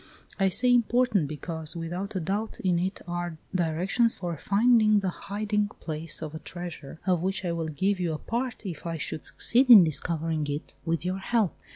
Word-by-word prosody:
I 195 0 +3
say 245 +7 +4
important, 240 - +2
because 160 +2 -5
without 175 +5 -5
a - - 0
doubt 200 +6 -3
in 180 -2 +1
it 185 +3 -2
are 175 -1 -4 0.2
directions 185 +7 +1
for 175 -2 -4
finding 215 - +4
the 195 -2 -1
hiding 210 +2 -2
place 160 0 -3
of 155 -1 -6
a 160 - -6
TREASURE, 170 -4 -8
of 180 -3 +2
which 190 +1 -2
I 175 - 0
will 165 -1 -2
give 190 +6 0
you 175 -2 -1
a - - -3
part 235 +4 -4
if 170 -3 -6
I 165 -1 -3
should 155 - -4
succeed 255 +2 +3
in 220 -6 +11
discovering 160 -1 -1
it 145 +1 -5
with 165 +1 -1
your 185 +1 -2
help. 215 -1 0
180 Hz, 190 wpm, -27 LUFS, 165-210 Hz, 0.2 s, in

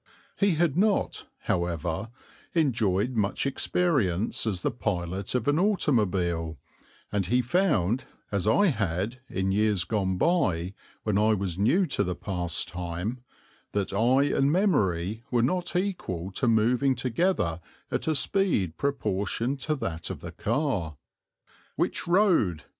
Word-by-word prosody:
He 200 -4 +2
had 160 -3 +1
not, 200 +3 +1
however, 85 +3 -2 0.5
enjoyed 115 - +2
much 105 -1 0
experience 130 - 0
as 95 -5 -1
the - - +1
pilot 95 -3 -3
of 120 -3 -1
an 145 +2 +3
automobile, 95 - +1 0.5
and 100 -3 0
he 125 +2 +2
found, 125 - +1 0.3
as 100 -1 -1
I 185 - +4
had 105 - -2
in 95 0 -1
years 105 -2 +2
gone 95 0 -1
by 95 - +1 0.3
when 105 -2 +1
I 110 +1 +4
was 95 -3 -3
new 170 - +3
to 105 - 0
the 90 -2 -2
pastime, 90 +3 -2 0.5
that 100 -1 -1
eye 120 +7 +3
and 140 +1 +3
memory 110 - +1
were 120 -2 +2
not 180 +7 -1
equal 175 - -2
to 125 +7 -1
moving 120 +4 +3
together 125 - 0 0.3
at - - -1
a 160 - +2
speed 145 - +1
proportioned 120 -1 -1
to 155 +3 -1
that 85 - -4
of - - -6
the - - -7
car. 100 - -1 0.8
"Which - - -1
road?" 170 - +3
110 Hz, 135 wpm, -27 LUFS, 90-140 Hz, 0.8 s, I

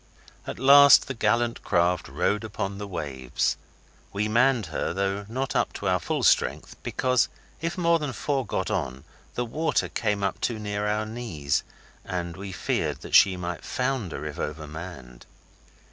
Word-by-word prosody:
At - - -5
last 140 +1 +8
the 135 - -3
gallant 115 +1 +1
craft 85 0 +1
rode 90 - 0
upon 100 -2 -4
the 105 - -5
waves. 70 -9 -2 0.6
We 105 +2 -1
manned 120 0 +3
her, - - -1
though 100 +1 -1
not 130 +3 -3
up - - +1
to - - -4
our - - +2
full - - -2
strength, - - +2
because 125 -2 +1 0.3
if 165 +3 -2
more 170 -1 +3
than 150 -3 -3
four 135 +1 -1
got 110 - -2
on 65 +1 -2 0.3
the 125 - -1
water 155 +4 0
came 105 -3 -1
up 100 - -1
too 115 - 0
near 105 -1 -2
our 105 +1 0
knees, 110 -12 -2 0.4
and 85 -2 -4
we 95 +1 -7
feared 95 - -2
she 95 -2 +7
might 90 -1 -5
founder 125 - -2
if 75 -1 -6
over 75 +1 -4
manned. 75 -6 -9
105 Hz, 160 wpm, -26 LUFS, 85-125 Hz, 0.6 s, last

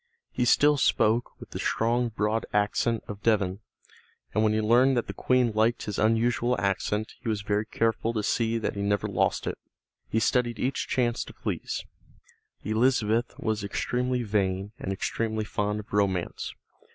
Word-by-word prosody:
He 125 - 0
still 145 +4 +5
spoke 115 -3 +2
with - - -12
the - - -5
strong 120 +1 +1
broad 110 0 -1
accent 105 +2 +1
of 105 0 -7
Devon, 100 -4 +1 0.7
and 110 - +2
when 110 - +3
he 110 - +1
learned 120 +4 +4
that 120 - +1
the - - -6
Queen 125 -2 +2
liked 110 +3 +1
his 105 -1 -4
unusual 120 +2 +2
accent 100 +3 -1
he 115 - -4
was 105 -2 -1
very 105 +1 0
careful 115 0 0
to 110 -2 -1
see 115 +2 +1
that 115 - -2
he 100 - -3
never 100 0 0
lost - - 0
it. - - -3 0.5
He 110 - +1
studied 120 +1 +1
each 130 +2 -1
chance 120 -2 0
to - - -12
please. - - -4 0.8
Elizabeth 115 +1 +1
was 110 -2 -2
extremely 125 +4 -1
vain 100 -2 -1
and 95 - -3
extremely 110 +2 -2
fond 105 0 -1
of 105 - -19
romance. 95 -4 -1
110 Hz, 165 wpm, -27 LUFS, 105-120 Hz, 0.8 s, still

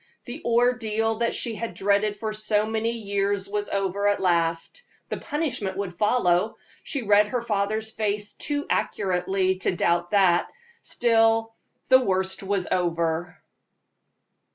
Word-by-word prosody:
The 240 - -7
ordeal 225 -2 +1
she 235 - -2
had 230 +2 -5
dreaded 205 +1 +1
for 215 0 -3
so 215 0 +1
many 225 +1 -1
years 200 -2 -1
was 205 +1 -3
over 200 +1 0
at 205 -1 +2
last 170 - 0 0.3
the - - -3
punishment 255 - -3
would 195 -3 -4
follow. 210 -1 +2 0.3
She 275 -5 -3
read 210 0 +4
her 240 +2 -2
father's 215 0 -1
face 210 -1 -2
too 290 0 -3
accurately 190 0 0
to 185 - 0
doubt 175 0 +1
that; 185 -4 +3 0.3
still, 225 -1 +2 0.4
the 260 0 +6
worst 190 -2 0
was 195 -1 -1
over. 170 -1 -1
205 Hz, 130 wpm, -25 LUFS, 190-225 Hz, 0.4 s, the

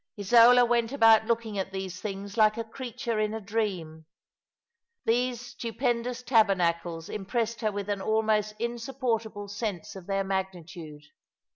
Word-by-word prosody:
Isola 240 +4 +7
went 235 -1 +1
about 225 -5 +5
looking 225 -3 -1
at 190 0 -3
these 190 -1 -5
things 200 -1 -5
like 215 -1 +4
a 230 - -2
creature 235 -1 -4
in 215 0 0
a - - -3
dream. 190 -7 -3 1.0
These 245 +1 +1
stupendous 240 0 -3
tabernacles 175 -8 +1
impressed 225 +2 -3
her 215 -2 +1
with 200 -1 -4
an 200 -1 -2
almost 215 0 +1
insupportable 235 -3 -3
sense 205 -4 -5
of 190 -2 -10
their 195 0 0
magnitude. 175 -5 -5
215 Hz, 135 wpm, -28 LUFS, 195-235 Hz, 1.0 s, Isola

